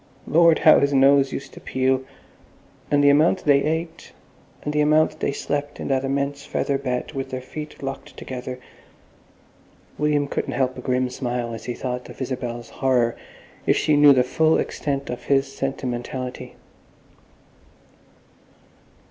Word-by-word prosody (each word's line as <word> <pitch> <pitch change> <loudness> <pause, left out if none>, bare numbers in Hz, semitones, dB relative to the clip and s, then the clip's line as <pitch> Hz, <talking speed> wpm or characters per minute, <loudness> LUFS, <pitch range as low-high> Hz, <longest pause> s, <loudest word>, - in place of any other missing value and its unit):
Lord! 165 0 +5
how - - +6
his 140 0 +1
nose 135 0 +5
used 140 - -6
to - - -11
peel! 130 0 0 0.9
And 145 0 +3
the 145 - +7
amount 155 +4 +3
they 140 -2 +5
ate, 160 +2 -3 0.5
and 150 - -3
the 150 - +2
amount 155 +1 +3
they - - 0
slept 145 +1 -3
in - - -4
that 135 -1 +1
immense 140 +1 -2
feather 140 -1 -1
bed 125 -2 -3
with 135 -1 -5
their 130 - -4
feet 150 +3 -9
locked 135 0 -6
together.... 125 0 -6 1.4
William 150 -1 +1
couldn't - - -3
help 130 -1 0
a 125 - -7
grim 125 0 0
smile 120 -2 -3
as 115 - -8
he 120 - -3
thought 125 -1 -5
of - - -12
Isabel's 125 -3 -4
horror 125 -3 +1 0.5
if - - +4
she 155 - +2
knew 145 0 +7
the 130 -2 +5
full 160 +5 +2
extent 140 -2 -3
of 125 - -7
his 135 -1 +1
sentimentality. 130 -1 -4
135 Hz, 150 wpm, -23 LUFS, 125-145 Hz, 1.4 s, the